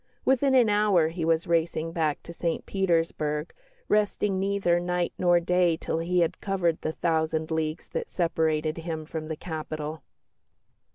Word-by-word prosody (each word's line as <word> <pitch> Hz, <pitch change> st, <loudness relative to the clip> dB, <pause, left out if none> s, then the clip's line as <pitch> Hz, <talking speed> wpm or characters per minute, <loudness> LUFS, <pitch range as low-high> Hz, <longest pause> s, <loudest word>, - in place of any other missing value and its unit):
Within 265 Hz, +1 st, +3 dB
an 245 Hz, -3 st, +6 dB
hour 205 Hz, -6 st, +3 dB
he 165 Hz, 0 st, -4 dB
was 165 Hz, +1 st, +2 dB
racing 165 Hz, -1 st, 0 dB
back 155 Hz, -3 st, -1 dB
to 170 Hz, -, -9 dB
St 170 Hz, 0 st, -2 dB
Petersburg, 165 Hz, -5 st, 0 dB, 0.3 s
resting 210 Hz, -2 st, +1 dB
neither 195 Hz, -3 st, +1 dB
night 175 Hz, 0 st, -1 dB
nor 175 Hz, -1 st, +4 dB
day 175 Hz, 0 st, +2 dB
until 160 Hz, 0 st, -2 dB
he 175 Hz, +2 st, +1 dB
had 165 Hz, -, -1 dB
covered 180 Hz, -5 st, 0 dB
the 155 Hz, -, -2 dB
thousand 160 Hz, -1 st, 0 dB
leagues 160 Hz, 0 st, -2 dB
that -, -, -4 dB
separated 160 Hz, -2 st, 0 dB
him 160 Hz, -1 st, -4 dB
from 155 Hz, 0 st, -5 dB
the 160 Hz, -, -3 dB
capital. 155 Hz, -2 st, -5 dB
165 Hz, 155 wpm, -27 LUFS, 160-180 Hz, 0.3 s, an